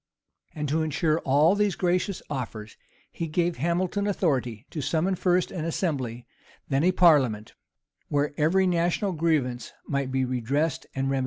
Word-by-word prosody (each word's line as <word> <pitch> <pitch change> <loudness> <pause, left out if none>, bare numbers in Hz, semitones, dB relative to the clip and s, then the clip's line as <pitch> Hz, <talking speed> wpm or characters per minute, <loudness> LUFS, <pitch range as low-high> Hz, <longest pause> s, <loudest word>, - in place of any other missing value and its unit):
[] - - -40
And 150 -1 -3
to 160 +3 +1
insure 155 +1 +1
all 150 +6 +4
these 205 -2 +1
gracious 180 +2 0
offers, 115 -6 -5 0.4
he 165 - -4
gave 170 +1 0
Hamilton 180 - 0
authority 130 - -1
to 155 - -4
summon 160 +6 0
first 180 0 +1
an 170 -4 -4
assembly, 135 - -2 0.4
then 135 +2 +1
a 180 - +4
parliament, 135 -12 +3 0.5
where 145 0 0
every 170 +6 +3
national 175 +2 +1
grievance 150 -7 -1
might 140 -2 -2
be 130 0 +1
redressed 130 +5 -1
and 135 0 -1
remedied. 135 - +1
155 Hz, 155 wpm, -26 LUFS, 135-175 Hz, 0.5 s, all